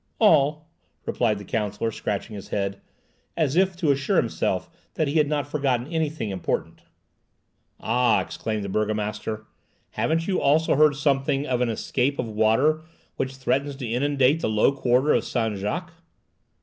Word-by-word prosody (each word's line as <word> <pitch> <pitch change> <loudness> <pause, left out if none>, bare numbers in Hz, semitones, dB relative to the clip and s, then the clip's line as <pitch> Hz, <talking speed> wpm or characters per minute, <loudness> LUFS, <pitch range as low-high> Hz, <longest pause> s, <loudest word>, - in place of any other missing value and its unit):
"All," 155 -6 +3 0.4
replied 110 -4 +1
the 100 - -9
counsellor, 105 +2 -2
scratching 105 +1 -4
his 100 -1 -8
head, 100 -1 -2 0.6
as 155 -3 +1
if 190 0 +3
to 170 -5 +2
assure 140 -1 0
himself - - 0 0.3
that 155 - +1
he 150 +3 +2
had 150 - +3
not 145 -2 -1
forgotten 135 -5 0
anything 155 -9 -1
important. 95 -3 -3 1.0
"Ah!" 125 -2 +2
exclaimed 110 -2 -3
the - - -4
burgomaster, 105 +1 -2 0.5
"haven't 165 +1 0
you 195 - 0
also 155 +3 +3
heard 150 0 +5
something 140 -1 +1
of 125 -3 0
an 125 - +2
escape 130 +4 -1
of 125 - -2
water 110 +9 +2 0.4
which 130 0 -2
threatens 135 +2 -1
to 130 -3 -5
inundate 135 +4 +2
the 165 - -1
low 110 +4 +3
quarter 130 +1 +2
of - - +2
Saint 110 -4 -1
Jacques?" 165 - -3
135 Hz, 155 wpm, -24 LUFS, 110-150 Hz, 1.0 s, heard